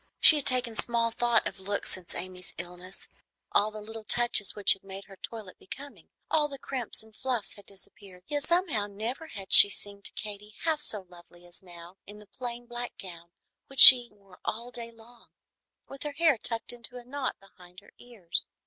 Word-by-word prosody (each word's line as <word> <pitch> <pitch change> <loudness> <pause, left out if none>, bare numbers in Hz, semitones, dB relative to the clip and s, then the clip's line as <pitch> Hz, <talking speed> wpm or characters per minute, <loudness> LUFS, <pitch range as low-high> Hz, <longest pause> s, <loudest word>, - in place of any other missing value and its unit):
She 310 - +8
had 290 - -3
taken 250 -3 +1
small 230 0 +1
thought 235 -1 +1
of - - -9
looks 200 +1 -2
since 185 -2 -4
Amy's 180 0 -8
illness. 180 +2 -10 0.4
All 210 +1 +2
the 215 0 -10
little 225 +1 -9
touches 235 -4 +3
which 205 - +6
had 195 - -12
made 195 0 -9
her 195 - -15
toilette 210 -1 -9
becoming, 280 +8 -11 0.2
all 300 -2 +1
the 280 -1 -8
crimps 255 -4 -5
and 220 -1 -21
fluffs, 250 -4 -3
had 205 - -15
disappeared; 195 -1 -12
yet 290 -1 -3
somehow 335 - 0
never 225 +10 -6
had 195 -10 -5
she 205 - +11
seemed 200 0 -3
to - - -3
Katy 210 0 -8
half 320 -2 0
so 210 -8 -2
lovely 175 0 -18
as 175 0 -6
now 175 0 -14
in 205 +1 -12
the 210 - -15
plain 240 +3 -8
black 240 0 -6
gown 170 -3 -11 0.4
which 270 -1 -9
she 245 -2 +11
wore 195 -3 -21
all 235 +3 -5
day 235 -1 -6
long, 230 +1 -19 0.6
with 275 0 -12
her 295 -1 -5
hair 315 -6 +2
tucked 230 +1 0
into 240 +1 -6
a 245 - -10
knot 260 0 -5
behind 180 -2 -18
her 205 - -22
ears. 215 -9 -3
215 Hz, 195 wpm, -28 LUFS, 195-245 Hz, 0.6 s, she